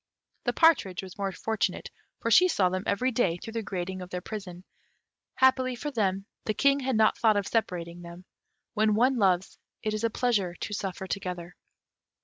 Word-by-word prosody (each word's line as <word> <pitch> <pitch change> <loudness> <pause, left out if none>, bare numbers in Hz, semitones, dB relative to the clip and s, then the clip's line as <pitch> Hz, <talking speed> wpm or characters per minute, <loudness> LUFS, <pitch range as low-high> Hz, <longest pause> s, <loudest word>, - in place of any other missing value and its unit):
The - - +1
partridge 200 - +3
was 190 +1 -11
more 195 -1 -1
fortunate, 220 +3 -2 0.3
for - - -1
she 365 - +7
saw 195 - +2
them 185 +1 -2
every 255 +6 +1
day 195 -8 +1
through 225 +5 -9
the 230 - -2
grating 185 -2 -4
of 180 - -8
their 180 - -3
prison: 185 -2 -7 0.7
happily 260 -1 +3
for 295 +5 -5
them, 195 -5 0 0.2
the 215 - -1
King 280 0 +3
had 260 -2 -1
not 220 0 +3
thought 220 -3 +4
of 200 - 0
separating 175 -6 -2
them. 170 +1 -11 0.5
When 215 -1 +2
one 250 +4 +3
loves, 190 -2 +1 0.2
it 215 - -1
is 215 +1 -3
a 230 - +3
pleasure 210 -7 0
to 205 - -5
suffer 190 -2 -4
together. 180 -3 -5
200 Hz, 185 wpm, -28 LUFS, 180-230 Hz, 0.7 s, she